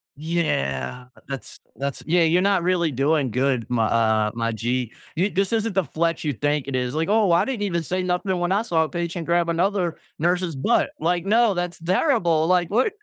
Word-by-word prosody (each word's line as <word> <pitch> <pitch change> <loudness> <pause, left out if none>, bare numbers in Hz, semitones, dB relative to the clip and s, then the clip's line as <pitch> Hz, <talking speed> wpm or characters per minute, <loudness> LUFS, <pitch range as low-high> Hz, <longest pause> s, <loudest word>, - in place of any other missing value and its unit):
Yeah, 125 - -2 0.2
that's 135 -1 -7 0.2
that's 140 +1 -4
Yeah, 170 +2 +3
you're 165 +2 +3
not 195 -2 +2
really 175 -3 +1
doing 140 -1 +1
good 130 -2 0
my 115 -2 +1
uh, 110 -2 +2
my 115 0 -1
g. 120 +2 -2 0.2
Y 185 +5 +1
this 195 +3 0
isn't 225 -1 0
the 190 - +3
flex 165 +1 -1
you 145 - 0
think 145 +3 -1
it 135 - -3
is, 125 0 -1
like, 160 +1 -1
"Oh, 210 -4 +3
I 170 - +4
didn't 260 -6 -3
even 170 -4 -1
say 185 +3 -2
nothing 180 +1 -1
when 175 +1 -1
I 200 +3 +2
saw 165 -7 +1
a 155 - -4
patient 170 -1 -4
grab 170 0 +2
another 180 0 0 0.2
nurse's 175 -1 0
butt." 225 - +2
Like 175 +1 0
"No, 225 +1 +4
that's 175 -1 -3
terrible," 175 - +2
like, 180 -1 +2
"What?" 250 - +2
170 Hz, 205 wpm, -23 LUFS, 140-185 Hz, 0.2 s, I